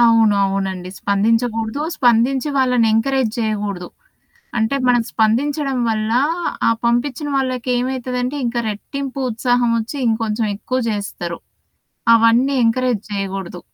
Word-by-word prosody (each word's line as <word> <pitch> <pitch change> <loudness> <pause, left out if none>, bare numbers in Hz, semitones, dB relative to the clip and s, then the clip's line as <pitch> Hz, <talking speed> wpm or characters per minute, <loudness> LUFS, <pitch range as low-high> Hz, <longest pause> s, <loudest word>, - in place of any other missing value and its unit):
అవును. 230 -3 +5
అవునండి. 190 -2 -3
స్పందించకూడదు. 225 +4 0 0.2
స్పందించి 250 +2 +2
వాళ్ళని 250 -3 +3
ఎంకరేజ్ 240 +1 +1
జేయగూడదు. 205 -5 -2 0.7
అంటే 220 +4 +1
మనం 245 -1 +4
స్పందించడం 270 +5 +1
వల్ల, 215 0 -1 0.6
ఆ - - +5
పంపిచ్చిన 250 +5 0
వాళ్ళకేమైతదంటే, 255 0 -1
ఇంకా 235 0 -1
రెట్టింపు 275 +6 -5
ఉత్సాహం 245 +1 +1
ఒచ్చి, 225 +6 -6
ఇంకొంచెం 220 0 0
ఎక్కువ 255 +5 -2
జేస్తారు. 190 -5 -4 0.8
అవన్నీ 230 +4 +4
ఎంకరేజ్ 235 -2 +1
జేయగూడదు. 195 -3 -4
230 Hz, 105 wpm, -19 LUFS, 215-255 Hz, 0.8 s, అవును